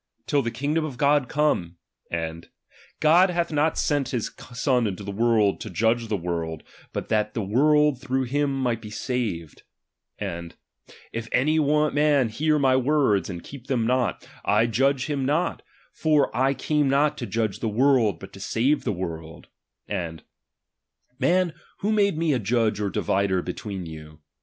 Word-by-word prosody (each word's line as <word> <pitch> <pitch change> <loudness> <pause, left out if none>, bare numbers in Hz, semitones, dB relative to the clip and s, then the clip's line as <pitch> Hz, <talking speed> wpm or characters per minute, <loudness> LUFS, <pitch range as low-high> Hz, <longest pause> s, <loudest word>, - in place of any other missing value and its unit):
till 145 - +2
the 120 - -2
kingdom 145 +7 -1
of 145 -5 -5
God 140 -1 +3
come: 90 - 0 0.3
and, 80 0 -4 0.5
God 170 +5 +5
hath 170 -1 -1
not 150 +1 +1
sent 145 -3 0
his 120 -4 -2 0.2
Son 125 -2 +1
into 100 0 -5
the 100 - -5
world, 110 -1 +2
to 110 - -5
judge 115 +5 +1
the 105 - -1
world, 85 -3 -4 0.3
but - - -2
RELIGION - - -24
that 105 -1 +1
the 110 - -1
world 145 +5 +3
through 130 0 -1
him 135 +1 -1
might 115 -2 -1
he 105 - -7
sated: 105 - -3 0.6
and, 85 0 -5 0.3
cHAr.xvii. - - -18 0.2
If 115 0 -5
any 155 +5 +2
man 150 -3 +3
hear 150 +7 +1
my 135 -3 +3
words, 130 -7 +2
and 85 -3 -7
heep 135 -2 -11
them 125 -5 0
not, 125 -1 0 0.2
I 105 +3 +3
Judge 135 +4 +1
him 145 -3 -2
not 150 +6 0 0.4
ijor 155 -3 +3
I 135 +2 +2
came 150 +1 +1
not 145 +2 +3
to 120 - -4
judge 110 0 -1
the 115 - -1
world, 120 -1 +3
but 95 - -11
to 95 - -11
saee 120 +8 +1
the 145 - -2
world: 80 -4 -6 0.4
and, 80 -3 -4 1.0
Man, 180 -1 +2 0.3
icho 210 +2 +2
made 200 -5 +2
me 160 -2 +1
a 130 - +1
judge 110 -1 +1
or 105 -1 0
divider 95 -1 0
between 95 0 -5
you 75 -1 -10
125 Hz, 170 wpm, -25 LUFS, 100-145 Hz, 1.0 s, God